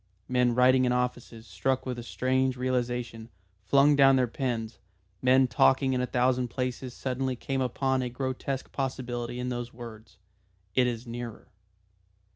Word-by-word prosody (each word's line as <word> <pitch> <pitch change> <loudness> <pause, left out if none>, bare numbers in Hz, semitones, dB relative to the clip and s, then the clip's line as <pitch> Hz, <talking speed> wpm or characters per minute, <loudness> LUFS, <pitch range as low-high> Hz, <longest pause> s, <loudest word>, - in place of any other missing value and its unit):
Men 125 -1 +2
writing 130 +1 +5
in 125 - +2
offices, 125 -2 -2
struck 130 +1 -1
with 125 -2 -4
a - - -4
strange 130 +2 0
realisation, 120 -2 -2 0.3
flung 140 +8 +4
down 135 -1 +6
their 130 -1 +3
pens, 120 -3 -3 0.4
men 130 +1 +5
talking 130 +2 +3
in 125 - 0
a 125 - -1
thousand 125 0 +1
places 125 0 -4
suddenly 130 0 -2
came 135 +2 -3
upon 130 +1 0
a 125 - -2
grotesque 130 +1 -4
possibility 125 -3 -3
in 125 0 -2
those 120 -1 -4
words, 110 -4 -11 0.6
"It 125 +3 +3
is 120 0 -3
nearer." 120 -1 -7
125 Hz, 150 wpm, -28 LUFS, 120-130 Hz, 0.6 s, down